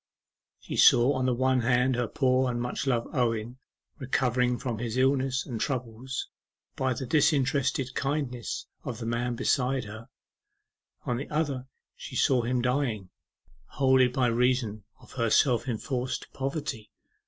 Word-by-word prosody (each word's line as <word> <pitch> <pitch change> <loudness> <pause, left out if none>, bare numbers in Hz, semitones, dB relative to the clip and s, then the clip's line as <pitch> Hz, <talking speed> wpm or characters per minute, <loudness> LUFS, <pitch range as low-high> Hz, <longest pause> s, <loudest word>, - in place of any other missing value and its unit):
She - - -6
saw 120 +4 +6
on 130 -1 0
the 125 - +2
one 130 +1 +2
hand 125 +2 +2
her 120 -1 0
poor 130 0 +2
and 120 -1 -2
much 125 +3 -3
loved 120 -3 0
Owen 120 -1 -1 0.4
recovering 125 -2 +1
from 120 -4 -4
his 120 0 -3
illness 135 0 +1
and 120 -5 -5
troubles 125 -1 -3 0.5
by 130 -1 0
the 130 - -4
disinterested 140 -2 +1
kindness 135 -4 -3 0.2
of - - -5
the 115 - -6
man 120 +1 -1
beside 130 +2 +1
her, 110 +2 -10 1.0
on 120 - -1
the 135 - -6
other 145 -4 -2 0.3
she - - -9
drew 130 -2 +3
him 120 +1 -1
dying, 125 -7 -1 0.6
wholly 130 -1 +3
by 125 +1 0
reason 120 -3 +1
of - - -17
her 115 -3 0
self 125 +1 +3
enforced 125 +2 -3
poverty. 135 -5 -4
125 Hz, 145 wpm, -28 LUFS, 120-130 Hz, 1.0 s, saw